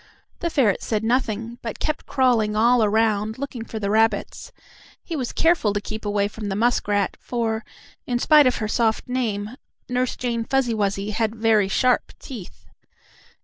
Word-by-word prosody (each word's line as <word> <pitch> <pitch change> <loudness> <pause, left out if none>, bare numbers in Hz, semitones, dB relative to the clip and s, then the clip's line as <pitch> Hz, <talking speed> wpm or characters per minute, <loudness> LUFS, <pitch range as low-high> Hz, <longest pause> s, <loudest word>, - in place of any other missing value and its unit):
The 340 - -1
ferret 250 - +2
said 215 -1 -1
nothing, 230 -1 -1
but 225 -2 -5
kept 305 - -3
crawling 235 -5 +2
all 235 +2 +4
around, 215 0 +1
looking 260 -4 -5
for 225 - -7
the 200 -2 -2
rabbits. 225 - 0 0.5
He 335 - -5
was 255 -5 -3
careful 325 -11 +2
to 205 - 0
keep 215 +1 -7
away 205 -1 +1
from 210 0 -6
the 195 - -2
muskrat, 205 -3 +1
for, 225 -2 -2 0.4
in 245 - 0
spite 300 +2 +6
of 250 - +2
her 215 - -2
soft 220 0 0
name, 220 -5 -2 0.4
Nurse 250 0 -1
Jane 235 -2 -2
Fuzzy 255 0 +1
Wuzzy 200 -1 -1
had 220 +1 -1
very 220 -3 +3
sharp 250 +5 +1
teeth. 225 -10 -10
225 Hz, 165 wpm, -23 LUFS, 210-250 Hz, 0.5 s, spite